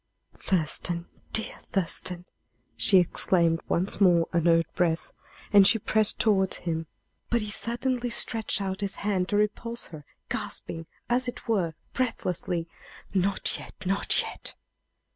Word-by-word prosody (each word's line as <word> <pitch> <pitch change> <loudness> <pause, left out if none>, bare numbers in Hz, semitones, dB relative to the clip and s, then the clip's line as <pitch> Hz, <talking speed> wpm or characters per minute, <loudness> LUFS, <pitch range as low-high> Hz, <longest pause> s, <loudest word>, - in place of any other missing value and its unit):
"Thurston! 170 0 +1 0.3
dear 220 - 0
Thurston!" 180 -1 -1 0.5
she 195 - +5
exclaimed 170 -1 +2
once 185 +4 0
more, 175 -3 +5
under 170 0 +4
her 165 - +2
breath, 165 -2 0 0.4
as 200 -1 +8
she 225 - +4
pressed 215 0 +3
toward 195 -4 +2
him. 165 -2 -3 0.4
But 235 -1 +1
he 210 0 -4
suddenly 245 +2 -2
stretched 225 -3 +2
out 190 0 -3
his 200 -1 -1
hand 190 -3 0
to 205 - +1
repulse 230 +3 -1
her, 155 -3 -10 0.2
gasping, 165 -1 -5 0.2
as 250 +1 +1
it 245 - -7
were, 185 -8 0 0.2
breathlessly, 180 -8 -2 0.5
"Not 195 0 0
yet - - -10
not 195 +2 +2
yet!" - - -7
190 Hz, 135 wpm, -27 LUFS, 170-220 Hz, 0.5 s, as